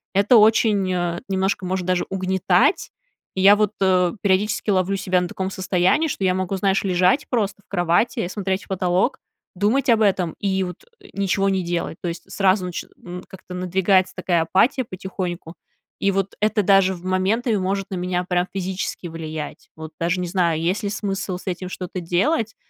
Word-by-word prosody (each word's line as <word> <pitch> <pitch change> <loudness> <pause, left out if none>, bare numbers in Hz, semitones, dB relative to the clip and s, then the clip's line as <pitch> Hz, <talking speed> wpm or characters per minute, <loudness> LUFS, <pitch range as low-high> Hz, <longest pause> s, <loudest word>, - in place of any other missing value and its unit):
это 205 +5 +5
очень, 210 -3 +4
э, 175 -1 -1
немножко 190 0 0
может 185 0 -2
даже 185 0 0
угнетать. 190 -1 +1 0.4
И 190 - -1
я 200 +2 +8
вот, 210 0 +1
э, 185 -2 +3
периодически 205 +2 +1
ловлю 190 0 +1
себя 185 -1 +1
на 180 - -2
таком 190 +1 -4
состоянии, 185 - +1
что 275 - -4
я 185 - +3
могу, 185 +1 -2
знаешь, 195 0 +1
лежать 185 +8 +2
просто 205 -5 -1
в - - -44
кровати, 175 +4 +1
и 175 - -3
смотреть 190 -1 -2
в - - -28
потолок, 185 +5 0 0.4
думать 235 +8 +1
об 225 -2 +4
этом 185 -5 +1
и 190 -1 0
вот, 180 -1 -7 0.2
э, 395 - -15
ничего 195 0 +1
не 190 -1 0
делать. 170 -1 -3
То 175 - -2
есть 170 +3 -8
сразу 190 -1 +2
начи 180 -2 -5 0.2
м, 180 0 -7
как-то 185 -1 -11
надвигается 185 +1 +2
такая 180 -2 +1
апатия 225 - +2
потихоньку. 180 -3 -6 0.4
И 200 - +2
вот 195 0 -2
это 215 0 +2
даже 195 -1 +4
в 175 - -13
моменты 205 +5 +1
может 195 +1 -2
на - - -2
меня 180 0 -1
прям 180 0 0
физически 190 -1 -4
влиять. 160 -2 -7
Вот 160 0 -8
даже 170 +2 0
не 180 - -2
знаю, 170 -3 +1
есть 180 +6 -1
ли 205 - -1
смысл 195 -2 -3
с - - -14
этим 185 0 -3
что-то 185 0 -6
делать 220 - 0
190 Hz, 190 wpm, -22 LUFS, 180-200 Hz, 0.4 s, я